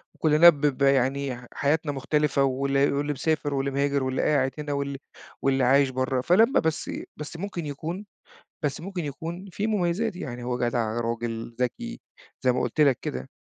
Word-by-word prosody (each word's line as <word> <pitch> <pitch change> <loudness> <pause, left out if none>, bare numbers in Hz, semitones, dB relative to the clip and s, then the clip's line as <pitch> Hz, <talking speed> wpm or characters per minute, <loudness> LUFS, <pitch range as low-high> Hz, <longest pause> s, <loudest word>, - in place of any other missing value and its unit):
وكُلّنا 155 +2 +7
ب 145 -3 0
ب 140 -2 +1
يعني 135 -1 +2
حياتنا 150 +1 +1
مختلفة 140 0 +1
واللي 135 +1 +2
واللي 145 +1 -1
مسافر 145 0 -1
واللي 135 0 -1
مهاجر 140 0 +1
واللي 130 0 -1
قاعد 135 -3 +2
هنا 145 -1 -3
واللي 140 -1 -2 0.4
واللي 135 -1 +2
عايش 135 +2 +4
برّه. 130 0 -1
فلمّا 220 - +4
بس 160 -1 -1 0.3
بس 150 +2 -7
ممكن 175 -3 -4
يكون 165 +8 -5 0.6
بس 145 +1 -1
ممكن 180 -3 -4
يكون 165 +6 -6
فيه 200 +6 -2
مميزات. 205 0 0
يعني 120 -7 -6
هو 125 0 -2
جدع، 115 -1 -1
راجل، 115 0 -3
ذكي 235 - -3 0.4
زي 130 - +3
ما 125 - 0
قُلت 125 +5 0
لك 140 -4 +5
كده. 65 +1 -5
140 Hz, 170 wpm, -26 LUFS, 130-160 Hz, 0.6 s, وكُلّنا